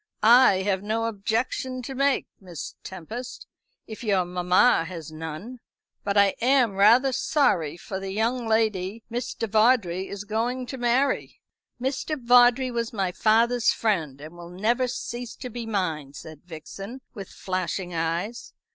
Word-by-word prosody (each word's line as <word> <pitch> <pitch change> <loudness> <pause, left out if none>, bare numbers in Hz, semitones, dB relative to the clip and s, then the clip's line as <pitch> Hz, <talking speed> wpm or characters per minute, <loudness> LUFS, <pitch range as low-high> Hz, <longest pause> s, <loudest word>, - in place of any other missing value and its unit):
"I 220 -4 +6
have 190 -1 0
no 220 +2 -1
objection 230 +4 -2
to 270 - -6
make, 275 +1 +1
Miss 180 -4 -8
Tempest, 220 +8 -8 0.4
if 220 +3 -9
your 195 -5 +1
mamma 180 +3 +3
has 165 -3 -8
none. 160 +10 -7 0.4
But 200 0 -1
I 200 -1 +5
am 250 -3 +3
rather 230 +7 +5
sorry 175 - +1
for 190 +2 -6
the 195 0 -5
young 230 +4 -1
lady 220 -1 0
Mr. 235 -1 -3
Vawdrey 210 -4 +2
is 200 0 -6
going 235 +4 -2
to 265 +1 -7
marry." 245 +3 0 0.4
"Mr. 270 +4 -2
Vawdrey 245 +1 +5
was 235 -1 -2
my 195 -4 -1
father's 230 +4 +3
friend, 165 -11 -1
and 155 +3 -10
will 170 0 -10
never 230 +8 0
cease 240 -1 -5
to 250 -2 -8
be 235 0 -6
mine," 160 -10 -2
said 155 +2 -11
Vixen, 195 +9 -9
with 200 -5 -8
flashing 185 -1 -4
eyes. 170 +8 -3
215 Hz, 145 wpm, -25 LUFS, 185-245 Hz, 0.4 s, I